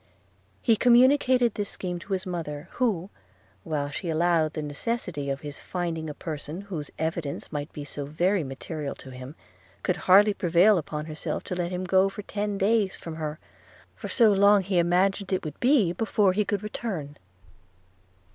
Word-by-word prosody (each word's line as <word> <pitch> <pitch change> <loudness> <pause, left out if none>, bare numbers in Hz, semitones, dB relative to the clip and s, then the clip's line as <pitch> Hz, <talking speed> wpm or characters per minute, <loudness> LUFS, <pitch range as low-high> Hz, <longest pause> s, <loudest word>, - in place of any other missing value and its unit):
He 230 - +5
communicated 250 0 +5
this 205 -1 -3
scheme 180 -2 -4
to 195 +3 -5
his 190 +1 -2
mother, 165 -3 -5
who, 205 -7 -1 0.5
while 150 -5 -2
she 170 +4 -4
allowed 160 -1 +2
the 155 - -4
necessity 150 - -3
of 135 +1 -2
his 145 -2 -7
finding 165 -3 -3
a 150 - -6
person 155 +2 -6
whose 175 -8 -6
evidence 160 -2 -3
might 145 0 -4
be 145 -2 -7
so 145 0 -6
very 175 +5 +1
material 140 +2 -5
to 130 - -12
him, 130 +3 -9 0.5
could 180 - 0
hardly 205 +3 +7
prevail 180 +3 +4
upon 150 -1 -5
herself 155 -1 -4
to 180 - -4
let 175 -1 -1
him 180 0 -3
go 190 +1 +3
for 205 +1 -8
ten 205 0 -3
days 200 0 +2
from 160 -1 -8
her; 155 -1 -4 0.6
for - - -7
so 220 +2 +5
long 200 0 +5
he 185 -1 +1
imagined 185 +3 +2
it 185 -3 0
would 150 - -6
be 245 - +3
before 205 -1 +2
he 210 +2 +1
could 205 +1 -2
return. 190 -9 -4
180 Hz, 175 wpm, -26 LUFS, 155-200 Hz, 0.6 s, hardly